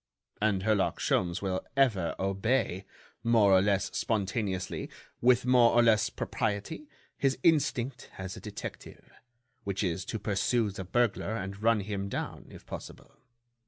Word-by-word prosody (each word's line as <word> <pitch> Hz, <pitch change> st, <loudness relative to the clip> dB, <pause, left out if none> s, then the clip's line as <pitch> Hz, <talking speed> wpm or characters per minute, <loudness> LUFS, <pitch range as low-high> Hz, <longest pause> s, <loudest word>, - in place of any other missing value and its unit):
And 100 Hz, -3 st, +1 dB
Herlock 105 Hz, -2 st, +1 dB
Sholmes 90 Hz, +2 st, 0 dB
will 95 Hz, -1 st, -1 dB, 0.2 s
ever 105 Hz, -12 st, +2 dB
obey, 95 Hz, 0 st, 0 dB, 0.4 s
more 110 Hz, -4 st, +5 dB
or 95 Hz, -, +6 dB
less 100 Hz, -1 st, 0 dB
spontaneously, 100 Hz, -3 st, -2 dB, 0.3 s
with 125 Hz, 0 st, +4 dB
more 125 Hz, -2 st, +5 dB
or 120 Hz, -, +6 dB
less 110 Hz, -3 st, +4 dB
propriety, 110 Hz, -, -3 dB, 0.3 s
his 135 Hz, -1 st, +1 dB
instinct 135 Hz, -6 st, +1 dB
as 95 Hz, 0 st, -6 dB
a -, -, -8 dB
detective, -, -, -8 dB, 0.5 s
which 100 Hz, +1 st, -2 dB
is 90 Hz, 0 st, -1 dB
to 110 Hz, -, -3 dB
pursue 105 Hz, +2 st, 0 dB
the 95 Hz, -1 st, -7 dB
burglar 110 Hz, +1 st, 0 dB
and 100 Hz, -1 st, -5 dB
run 115 Hz, -1 st, +3 dB
him 100 Hz, -1 st, -4 dB
down, -, -, -5 dB
if -, -, -13 dB
possible. -, -, -9 dB
105 Hz, 140 wpm, -29 LUFS, 95-120 Hz, 0.5 s, or